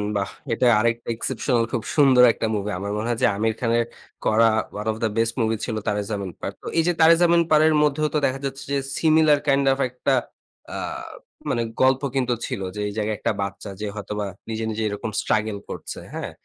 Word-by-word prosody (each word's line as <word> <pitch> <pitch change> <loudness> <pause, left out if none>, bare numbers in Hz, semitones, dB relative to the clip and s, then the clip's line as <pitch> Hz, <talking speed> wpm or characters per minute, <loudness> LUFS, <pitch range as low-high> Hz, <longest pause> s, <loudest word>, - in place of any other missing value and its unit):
বাহ! 100 -1 -1 0.2
এটা 115 +2 +1
আরেকটা 115 +1 0
exceptional 120 0 0
খুব 120 -4 -1
সুন্দর 135 -4 +6
একটা - - -3
মুভি। 105 0 -2
আমার 100 +1 -4
মনে 110 +2 -2
হয় 115 - -1
যে - - +7
আমির 110 +1 +1
খানের 115 -1 +1 0.4
করা 115 +1 +5 0.3
one 105 +1 -5
of 110 - -6
the 110 - +2
best 115 0 +2
movie 110 0 +1
ছিল 110 - -3
Taare 105 0 0
Zameen 100 -4 -3
Par. - - -3
তো - - -9
এই 165 - +4
যে - - +4
Taare 165 +1 +7
Zameen 170 0 +5
Par 155 - +6
এর 160 - +3
মধ্যেও 150 +1 +1
তো - - +2
দেখা 130 +1 -1
যাচ্ছে 135 0 -5
যে 140 - +2 0.2
সিমিলার 155 -2 +4
কাইন্ড 140 0 +3
ওফ 135 - -6
একটা 125 +2 -1 0.6
আ - - -5 0.7
মানে 120 - 0 0.2
গল্প 130 0 +4
কিন্তু 125 -2 +1
ছিল। - - -4
যে - - -5
এই 100 - -5
জায়গায় 110 0 -1
একটা - - 0
বাচ্চা 100 +1 -5
যে - - -2
হয়তোবা 105 0 -4 0.2
নিজে, 110 0 -3
নিজে 110 +1 -3
এরকম 105 +2 -4
স্ট্রাগেল 110 -1 0
করছে। - - -6
হ্যাঁ? - - -5
115 Hz, 210 wpm, -23 LUFS, 105-135 Hz, 0.7 s, যে